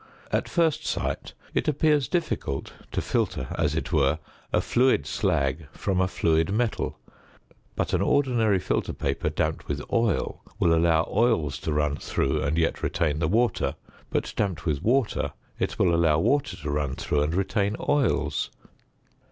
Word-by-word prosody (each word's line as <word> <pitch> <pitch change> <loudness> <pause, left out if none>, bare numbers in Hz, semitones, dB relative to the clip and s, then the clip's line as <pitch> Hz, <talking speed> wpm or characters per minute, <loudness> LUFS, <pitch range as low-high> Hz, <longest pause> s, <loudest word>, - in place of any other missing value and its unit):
At - - 0
first 160 -3 +2
sight - - -3 0.2
it - - 0
appears 150 -2 +3
difficult 160 - -2 0.2
to - - -1
filter, 65 - -1
as 75 -2 0
it 85 +2 -3
were, 70 -1 +3 0.3
a - - +3
fluid 130 +2 +2
slag 80 - 0
from 95 -2 0
a 95 - +3
fluid 80 -2 +1
metal; 115 +2 -1 0.8
but - - -1
an - - +2
ordinary 120 -8 +3
filter 90 - -1
paper 70 0 -1
damped - - -2
with 70 -1 -2
oil 115 -3 +1 0.2
will 85 - +3
allow 80 -1 +3
oils 100 - +2
to - - -3
run 75 -1 +1
through 70 +1 -1
and 70 +3 0
yet 80 0 +1
retain 80 -2 0
the 80 - +1
water; 115 +7 +1 0.3
but - - -2
damped 95 -6 -1
with 75 -4 0
water 125 0 +1 0.3
it - - -1
will 90 -2 +3
allow 85 -2 +4
water 140 - +1
to 75 -1 -4
run 70 -2 -1
through 75 - 0
and 75 +3 0
retain 100 +2 0
oils. 110 - +1
85 Hz, 160 wpm, -26 LUFS, 75-115 Hz, 0.8 s, allow